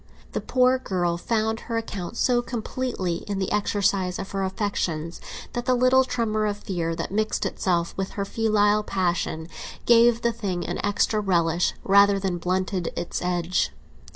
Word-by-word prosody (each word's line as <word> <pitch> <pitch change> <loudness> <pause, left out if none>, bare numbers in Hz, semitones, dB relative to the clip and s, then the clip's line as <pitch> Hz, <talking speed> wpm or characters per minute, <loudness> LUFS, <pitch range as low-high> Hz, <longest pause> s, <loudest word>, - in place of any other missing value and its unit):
The - - -2
poor 255 0 +3
girl 175 -7 -1
found 220 +4 -1
her 230 - 0
account 205 -2 -5
so 245 -1 +3
completely 235 -6 -3
in 200 -1 -2
the 190 -1 -2
exercise 200 -3 +1
of 195 - -6
her 195 -1 -1
affections 185 -5 -2 0.3
that 240 +1 -4
the 255 - +4
little 255 +1 +5
tremor 215 -4 0
of 205 -1 -2
fear 170 -5 -3
that 165 - -4
mixed 215 +2 0
itself 170 -2 0
with 190 0 -3
her 200 - -2
filial 210 -1 +2
passion 175 -5 -1 0.4
gave 235 0 +5
the 235 0 +2
thing 195 -6 -3
an - - -3
extra 205 +1 +1
relish 170 -4 +1
rather 200 0 +5
than 190 -3 -2
blunted 185 0 -1
its 175 - -3
edge. 180 0 0
200 Hz, 160 wpm, -25 LUFS, 180-225 Hz, 0.4 s, little